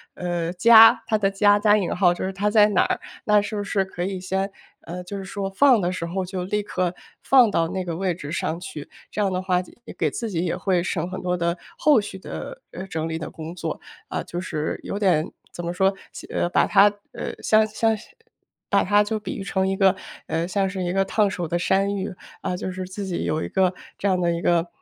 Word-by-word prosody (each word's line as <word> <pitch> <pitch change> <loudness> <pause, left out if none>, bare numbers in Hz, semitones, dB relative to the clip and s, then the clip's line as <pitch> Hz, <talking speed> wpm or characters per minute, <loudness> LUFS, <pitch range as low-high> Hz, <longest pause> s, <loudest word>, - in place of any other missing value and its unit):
呃， 175 -1 -2
“家” 230 +2 +8
它 215 - +2
的 200 -1 +1
“家” 205 +1 +4
加 210 0 +5
引 190 -5 -1
号 180 -1 +4
就 175 - -4
是 190 - -3
它 205 +2 0
在 210 -1 +6
哪 200 - +3
儿？ - - -1 0.2
那 210 -1 +4
是 210 +1 -5
不 205 - -2
是 195 -1 0
可 175 -2 -5
以 190 0 -3
先 190 +2 -2 0.3
呃， 180 +2 -7
就 200 +2 -6
是 195 - -6
说 195 0 -4
放 250 +4 +5
的 180 -1 -1
时 170 - -3
候 185 +2 -2
就 180 0 -4
立 210 +3 -1
刻 180 -3 -2 0.3
放 255 -5 +6
到 165 -3 +1
那 185 0 -3
个 170 -2 -3
位 185 +1 0
置 150 -3 -7
上 165 -1 -2
去？ 155 -5 -8 0.2
这 210 - -3
样 195 -2 +1
的 185 - -1
话， 185 -1 +1
这 180 - -14
也 - - -9
给 - - 0
自 230 - -4
己 175 -3 -1
也 175 0 -1
会 185 -1 +1
省 175 -2 -2
很 185 - -5
多 180 0 -1
的 170 +1 0 0.2
后 295 -7 +5
续 195 -2 -8
的， - - -7
呃， 190 - -6
整 160 -4 -3
理 160 0 -3
的 160 - -6
工 160 +2 -8
作。 - - -4 0.3
啊， - - -2
就 175 - -5
是， 155 -4 -3
有 200 - -4
点 175 -6 +2 0.2
怎 175 - -6
么 170 - -2
说？ 190 +2 +2 0.2
先 - - -10
呃， 175 - +1
把 - - +3
它 200 +1 +6 0.2
呃， - - -4
像 215 0 +4
是 215 - -11
像 225 -1 +2
是 210 - -12 0.6
把 200 - +3
它 205 +2 +4
就 215 +1 -2
比 200 -3 -5
喻 195 - -5
成 190 -1 0
一 195 - 0
个 195 -1 +4 0.3
呃， 165 +1 -1
像 195 +1 0
是 190 -1 -4
一 175 0 -1
个 195 - +3
烫 210 +1 +2
手 180 -3 -3
的 175 +2 -1
山 195 +3 +1
芋， 190 -1 -4 0.3
啊， 180 - -2
就 185 - -4
是 185 0 -5
自 190 +2 -6
己 180 -2 -3
有 155 +1 -1
一 - - -4
个 190 -1 +2 0.3
这 200 - 0
样 185 -2 +2
的 175 -1 +1
一 170 0 -2
个， 170 -1 +2
190 Hz, 270 characters per minute, -23 LUFS, 175-205 Hz, 0.6 s, 家